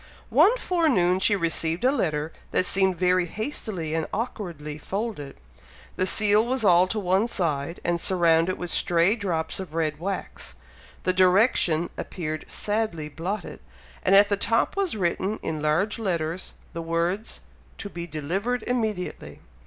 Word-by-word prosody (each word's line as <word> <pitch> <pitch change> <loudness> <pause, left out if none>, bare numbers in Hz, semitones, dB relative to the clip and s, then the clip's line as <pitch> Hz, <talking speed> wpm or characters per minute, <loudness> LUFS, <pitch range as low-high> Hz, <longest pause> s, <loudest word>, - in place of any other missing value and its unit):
One 485 +4 +5
forenoon 265 - +2
she 205 +2 +3
received 165 -1 0
a 260 - +5
letter 155 - -1 0.2
that - - +1
seemed 190 -1 +2
very 180 0 +2
hastily 210 - -4
and 160 -1 -1
awkwardly 170 - -5
folded, 195 -6 -4 0.6
the 185 - 0
seal 210 +3 +4
was 255 0 -1
all 180 -1 +6
to 220 - -3
one 195 +2 +2
side, 165 -6 -2
and 170 -1 0
surrounded 170 -1 +2
with 175 -1 -4
stray 175 +4 +3
drops 175 -8 -2
of 175 -5 -7
red 155 -2 -1
wax, 195 +3 -5 0.5
the 185 - +2
direction 185 -3 +3
appeared 155 -3 -5
sadly 205 -8 -2
blotted, 175 +8 -5 0.4
and 195 - +4
at 200 +1 +7
the 200 - +1
top 230 +3 +1
was 390 - -1
written 190 +3 -1
in 155 -2 -3
large 165 +9 +1
letters, 175 -4 -2 0.2
the 165 - -4
words, 170 +6 -2 0.4
"To - - -6
be 170 -3 -7
delivered 185 +11 -2
immediately." 220 -7 -3
185 Hz, 145 wpm, -25 LUFS, 165-210 Hz, 0.6 s, at